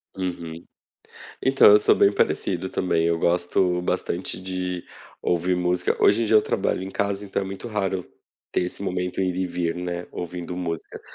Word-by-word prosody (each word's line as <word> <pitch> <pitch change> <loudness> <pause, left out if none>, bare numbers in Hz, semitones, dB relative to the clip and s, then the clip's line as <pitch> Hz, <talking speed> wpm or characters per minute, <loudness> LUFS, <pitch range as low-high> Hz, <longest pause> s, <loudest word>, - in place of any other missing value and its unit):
Uhum. 85 -3 -5 0.8
Então, 135 -5 +6
eu 105 - +8
sou - - +4
bem 100 - +4
parecido 95 - 0
também. 85 -3 0
Eu 85 0 +1
gosto 90 +1 +1
bastante 90 +1 -2
de 90 -1 -4 0.4
ouvir 90 +1 +1
música. 90 0 +1
Hoje 110 +3 +5
em - - +2
dia 110 0 +5
eu 105 - +6
trabalho 95 - -1
em 95 - -5
casa, 100 0 -1
então 100 0 -2
é - - -2
muito 95 +5 -7
raro 95 -4 -2 0.5
ter - - +1
esse 90 +2 -3
momento 90 -1 -2
ir 90 -1 0
e 95 0 -1
vir, 85 -1 -2
né, 90 0 -4
ouvindo 90 0 -5
música. 85 -3 -4
90 Hz, 180 wpm, -24 LUFS, 90-95 Hz, 0.8 s, eu